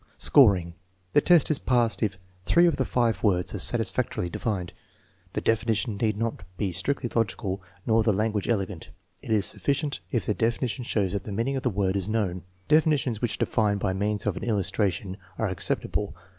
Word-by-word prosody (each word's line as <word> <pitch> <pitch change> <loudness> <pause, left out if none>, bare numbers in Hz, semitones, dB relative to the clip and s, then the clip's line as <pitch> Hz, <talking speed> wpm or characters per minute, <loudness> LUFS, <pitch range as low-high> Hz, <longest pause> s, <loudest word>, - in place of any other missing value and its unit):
Scoring. 95 - +5 0.4
The 145 - +5
test 170 -2 +4
is 150 - +1
passed 120 -3 +1
if 100 -4 -1 0.3
three 170 - +4
of 170 - +2
the 130 - 0
five 120 -2 0
words 90 -4 +1
are - - -4
satisfactorily 85 - +3
defined. 95 -5 -3 0.6
The - - -2
definition 110 -1 0
need 105 -1 0
not 115 -2 -3 0.2
be 100 -3 -1
strictly 120 +9 -1
logical 100 -4 -1 0.2
nor 115 0 +3
the 110 0 +2
language 105 +1 -1
elegant. 100 -6 -2 0.3
It - - -11
is 105 -3 +2
sufficient 145 +1 -1
if 120 - -1
the 105 - 0
defi 115 +4 0
nition 125 +1 -4
shows 100 -5 -1
that 100 - -2
the 105 - -8
meaning 115 +7 -1
of 135 - -2
the 130 - 0
word 95 -2 -1
is 100 0 -1
known. 100 -5 -1 0.3
Defi 155 +1 +4
nitions 125 -7 -1
which 120 -4 -1
define 105 -2 +1
by 95 -1 -1
means 105 +2 -2
of 105 -3 0
an - - -6
illustration 100 -3 -1 0.2
are - - -1
ac - - -5
ceptable. - - -2
110 Hz, 195 wpm, -26 LUFS, 100-120 Hz, 0.6 s, Scoring